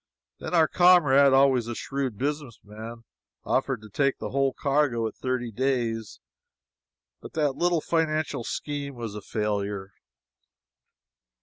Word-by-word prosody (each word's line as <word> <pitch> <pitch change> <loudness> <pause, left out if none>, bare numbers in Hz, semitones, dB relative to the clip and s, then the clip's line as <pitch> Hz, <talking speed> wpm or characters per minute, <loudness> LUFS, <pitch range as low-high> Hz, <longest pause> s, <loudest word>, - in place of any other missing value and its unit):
Then - - -3
our 160 -2 +5
comrade, 150 -7 +5
always 135 -3 +4
a 120 - -4
shrewd 135 -5 -3
businessman, 115 -5 -5 0.4
offered 130 -4 -1
to 110 - -11
take 140 +5 +1
the - - -6
whole 135 0 +2
cargo 135 -4 +1
at 110 - -7
thirty 130 -2 -3
days, 120 -3 -2 1.0
but - - -10
that 150 -4 0
little 175 -2 +1
financial 155 -6 -1
scheme 145 +2 -4
was 115 -3 -6
a 105 - -7
failure. 100 -2 -3
130 Hz, 125 wpm, -26 LUFS, 115-145 Hz, 1.0 s, our